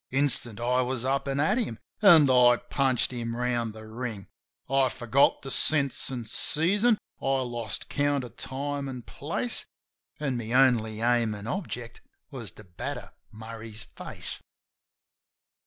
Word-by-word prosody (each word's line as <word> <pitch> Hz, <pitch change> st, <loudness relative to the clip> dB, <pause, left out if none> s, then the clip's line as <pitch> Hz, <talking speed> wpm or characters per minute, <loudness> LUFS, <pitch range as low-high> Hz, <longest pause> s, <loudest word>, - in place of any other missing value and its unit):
Instant 130 Hz, -5 st, +2 dB
I 125 Hz, +2 st, +2 dB
was 125 Hz, -1 st, -1 dB
up 135 Hz, +1 st, 0 dB
an' 135 Hz, 0 st, -1 dB
at 195 Hz, -, +2 dB
him, 120 Hz, -, -3 dB, 0.2 s
an' 170 Hz, -8 st, +8 dB
I 125 Hz, -2 st, +6 dB
punched 130 Hz, +1 st, 0 dB
him 115 Hz, -1 st, -4 dB
round 120 Hz, -2 st, -1 dB
the 110 Hz, 0 st, -10 dB
ring. 110 Hz, -3 st, -5 dB, 0.4 s
I 135 Hz, -1 st, +3 dB
forgot 130 Hz, +1 st, +2 dB
the 135 Hz, -, -3 dB
scents 140 Hz, -1 st, +3 dB
an' 120 Hz, -3 st, -4 dB
season; 200 Hz, -, +2 dB, 0.2 s
I 135 Hz, -1 st, +1 dB
lost 120 Hz, -4 st, -4 dB
count 145 Hz, -1 st, 0 dB
of 120 Hz, -, -10 dB
time 140 Hz, +1 st, -2 dB
an' 125 Hz, -2 st, -7 dB
place; -, -, -1 dB, 0.6 s
An' 135 Hz, -4 st, -1 dB
my 115 Hz, 0 st, -4 dB
only 115 Hz, -4 st, +3 dB
aim 120 Hz, -2 st, +2 dB
an' 100 Hz, 0 st, -8 dB
object 120 Hz, -, -5 dB, 0.3 s
was 120 Hz, -7 st, -7 dB
to 105 Hz, -, -13 dB
batter 90 Hz, -3 st, -6 dB, 0.2 s
Murray's 110 Hz, 0 st, -8 dB
face. -, -, -6 dB
125 Hz, 145 wpm, -27 LUFS, 115-140 Hz, 0.6 s, an